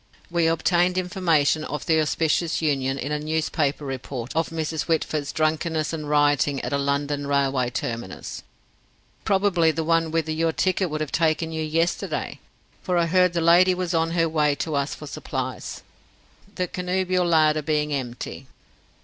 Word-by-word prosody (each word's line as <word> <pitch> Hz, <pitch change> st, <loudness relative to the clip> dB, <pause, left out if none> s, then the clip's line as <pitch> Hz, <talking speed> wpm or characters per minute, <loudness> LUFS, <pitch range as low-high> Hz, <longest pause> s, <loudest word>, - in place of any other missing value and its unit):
We 170 Hz, -1 st, +2 dB
obtained 175 Hz, +2 st, +2 dB
information 165 Hz, -5 st, +1 dB
of 150 Hz, -1 st, -5 dB
the 160 Hz, -1 st, +3 dB
auspicious 160 Hz, +2 st, 0 dB
union 135 Hz, -4 st, 0 dB
in 140 Hz, +2 st, -4 dB
a 150 Hz, -, 0 dB
newspaper 155 Hz, -1 st, -1 dB
report 130 Hz, -1 st, -5 dB
of 165 Hz, 0 st, +1 dB
Mrs. 160 Hz, -1 st, -3 dB
Whitford's 155 Hz, -3 st, -1 dB
drunkenness 155 Hz, +1 st, 0 dB
and 155 Hz, -2 st, -4 dB
rioting 145 Hz, -1 st, +2 dB
at -, -, -4 dB
a -, -, +2 dB
London 140 Hz, +1 st, -1 dB
railway 135 Hz, -3 st, +1 dB
terminus 115 Hz, -5 st, -5 dB, 0.8 s
probably 190 Hz, -4 st, +3 dB
the 160 Hz, +1 st, -1 dB
one 165 Hz, 0 st, +2 dB
whither 160 Hz, -1 st, -1 dB
your 160 Hz, +1 st, 0 dB
ticket 185 Hz, 0 st, +1 dB
would 155 Hz, 0 st, -3 dB
have 155 Hz, -, -3 dB
taken 160 Hz, 0 st, +1 dB
you 160 Hz, 0 st, -3 dB
yesterday, 165 Hz, +2 st, -1 dB, 0.4 s
for 180 Hz, -2 st, 0 dB
I 170 Hz, -, +3 dB
heard 180 Hz, +1 st, +3 dB
the 170 Hz, -, 0 dB
lady 175 Hz, +3 st, +5 dB
was 180 Hz, -1 st, -2 dB
on 165 Hz, 0 st, +2 dB
her 165 Hz, 0 st, +3 dB
way 150 Hz, -2 st, +2 dB
to 155 Hz, +2 st, -3 dB
us 140 Hz, 0 st, -1 dB
for 150 Hz, -, -10 dB
supplies, 145 Hz, -, -5 dB, 0.7 s
the 180 Hz, -1 st, -1 dB
connubial 185 Hz, 0 st, 0 dB
larder 155 Hz, -2 st, +3 dB
being 150 Hz, 0 st, 0 dB
empty." 130 Hz, 0 st, -5 dB
155 Hz, 160 wpm, -24 LUFS, 145-170 Hz, 0.8 s, lady